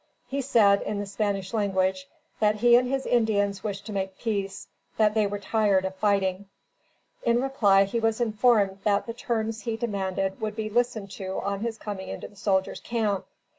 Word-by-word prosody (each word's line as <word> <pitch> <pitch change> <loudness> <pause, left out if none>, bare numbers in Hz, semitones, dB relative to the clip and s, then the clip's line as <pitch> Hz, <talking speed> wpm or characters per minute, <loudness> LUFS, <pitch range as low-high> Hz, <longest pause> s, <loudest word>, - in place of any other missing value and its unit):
He 275 +2 -2
said, 210 -6 +4
in 210 - -3
the 205 - -3
Spanish 200 0 -2
language, 190 -3 0 0.3
that 210 0 +3
he 240 +3 +5
and 250 +1 +3
his 270 0 -1
Indians 205 -4 +1
wished 200 -2 -4
to 215 - -6
make 190 -1 -3
peace; 200 -4 -3 0.3
that 215 -1 +4
they 215 -2 +2
were 205 +1 -3
tired 200 -2 +1
of 190 - -3
fighting. 195 -1 0 0.7
In 235 0 +2
reply, 215 -7 +4
he 200 +4 -2
was 225 0 +1
informed 215 -4 +2
that 200 -1 +2
the 230 - -5
terms 225 -2 -2
he 225 +1 -3
demanded 195 -3 -2
would 215 -1 -3
be 215 -1 -3
listened 235 -4 0
to 190 -2 -4
on 200 0 -2
his 225 +1 -3
coming 200 -3 -6
into - - -6
the 205 - -20
soldiers' 190 -1 0
camp. 215 -5 -1
205 Hz, 185 wpm, -26 LUFS, 195-225 Hz, 0.7 s, he